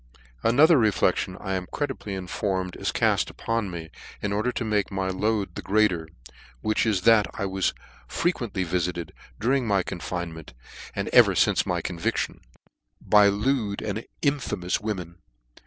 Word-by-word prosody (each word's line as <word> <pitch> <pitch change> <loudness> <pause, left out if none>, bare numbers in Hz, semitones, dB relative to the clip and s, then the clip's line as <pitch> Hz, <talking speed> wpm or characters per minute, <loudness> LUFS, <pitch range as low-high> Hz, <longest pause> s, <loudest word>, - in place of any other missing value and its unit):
Another 145 +6 +5
reflection, 105 -3 +1
I 95 -2 -3
am 90 -1 -2
credibly 135 -8 -3
informed, 95 0 -2
is - - -2
call - - +2
upon 115 -3 -2
me, 85 -2 -7 0.3
in 105 -1 -2
order 110 +5 0
to 120 - -3
make 105 -2 0
my 95 -1 -1
load 105 +1 -1
the - - -6
greater: 95 -6 +2 0.5
which 110 +1 +1
is, 100 -4 +1
that 110 0 +5
I 100 - -2
was 95 0 0 0.3
frequently 120 - -1
vifitcd, 85 -1 -2 0.3
during 125 +3 +1
my 100 -3 +2
confinement, 85 -4 -5 0.4
and - - -2
even - - +7
fince - - +3
my - - -1
con 90 -2 -5
viftion, - - -1 0.6
by 105 -1 +5
lewd 105 0 0
and 110 +2 -3 0.2
infamous 135 - 0
women. 90 -5 -4
100 Hz, 150 wpm, -25 LUFS, 90-110 Hz, 0.6 s, even